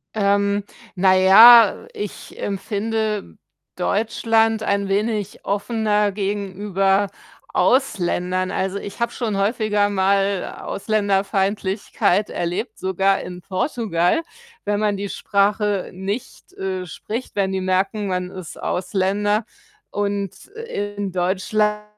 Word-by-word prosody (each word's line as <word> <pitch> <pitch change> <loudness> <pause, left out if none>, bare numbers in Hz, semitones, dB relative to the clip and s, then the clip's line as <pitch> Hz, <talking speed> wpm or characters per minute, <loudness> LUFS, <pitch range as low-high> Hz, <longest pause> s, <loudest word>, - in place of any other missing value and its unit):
Ähm, 200 0 +2 0.3
na 185 +1 +4
ja, 220 +4 +8
ich 205 -1 -7
empfinde 210 - -2 0.4
Deutschland 225 +1 +1
ein 200 -1 0
wenig 205 0 -1
offener 210 0 0
gegenüber 195 -1 0 0.4
Ausländern. 185 -7 +1
Also, 190 +1 -2
ich 200 +4 -9
habe 235 - +1
schon 220 -5 -2
häufiger 205 0 +1
mal 195 0 +1
Ausländerfeindlichkeit 200 -1 0
erlebt, 180 +7 -3
sogar 190 +1 +1
in 180 0 -8
Portugal, 195 - 0 0.4
wenn 205 0 0
man 210 -1 +1
die 200 0 -4
Sprache 205 -1 0
nicht, 200 +7 -6
äh, 190 -1 -4
spricht, 220 +9 -6
wenn 195 -1 +1
die 190 - -1
merken, 190 +3 0
man 180 -1 -2
ist 185 -4 -9
Ausländer 200 +4 0 0.5
und 200 -2 -3
in 205 - -5
Deutschland 210 +4 0
200 Hz, 105 wpm, -21 LUFS, 190-210 Hz, 0.5 s, ja